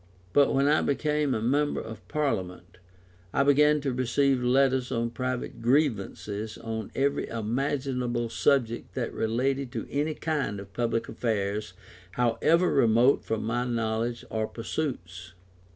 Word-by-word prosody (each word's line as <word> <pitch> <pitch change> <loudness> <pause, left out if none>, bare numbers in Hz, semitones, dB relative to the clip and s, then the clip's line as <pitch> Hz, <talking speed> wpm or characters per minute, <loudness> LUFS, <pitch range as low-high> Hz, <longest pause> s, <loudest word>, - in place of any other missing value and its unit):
But 140 -1 +5
when 135 +1 +2
I 150 +1 +4
became 150 0 0
a 110 - -2
member 145 +5 +1
of 110 -1 -9
Parliament. 95 - -3 0.5
I 140 - +3
began 150 +1 +4
to 135 -2 -1
receive 130 +1 +1
letters 130 0 +2
on 115 -2 -1
private 130 -1 -4
grievances 110 -5 0
and - - -14
on 110 -2 -4
every 140 +1 0
imaginable 125 +1 -1
subject 120 -2 0
that - - -2
related 130 +3 -1
to - - -3
any 150 +2 -1
kind 145 -10 -2
of 100 0 -11
public 115 0 -1
affairs, 105 -2 -2 0.4
however 125 - +2
remote 120 +1 +4
from 110 -1 -2
my 120 +2 0
knowledge 115 0 -2
or 110 -1 -1
pursuits. 95 - -5
125 Hz, 135 wpm, -27 LUFS, 110-140 Hz, 0.5 s, But